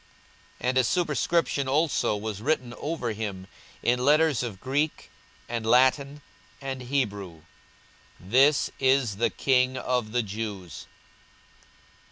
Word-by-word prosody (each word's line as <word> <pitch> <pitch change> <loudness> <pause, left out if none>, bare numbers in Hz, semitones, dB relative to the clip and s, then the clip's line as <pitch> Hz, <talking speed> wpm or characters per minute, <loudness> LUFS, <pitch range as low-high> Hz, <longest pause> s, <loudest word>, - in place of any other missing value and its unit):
42:023:038 125 - 0
And 130 - 0
a - - +4
superscription 155 -1 0
also 145 -6 +1
was 105 -1 -5
written 130 -2 -1
over 145 -6 -3
him 100 -4 -5 0.4
in 125 +1 +1
letters 150 0 +3
of 115 -6 -5
Greek, 145 +5 -2 0.4
and 115 -1 -3
Latin, 130 +5 +2 0.4
and 135 -2 -5
Hebrew, 105 - -3 0.8
THIS 130 +10 +3
IS 130 -6 +2
THE 115 - +2
KING 130 -1 +1
OF 125 -4 -1
THE 120 0 +1
JEWS. 100 -4 -6
125 Hz, 120 wpm, -26 LUFS, 110-140 Hz, 0.8 s, a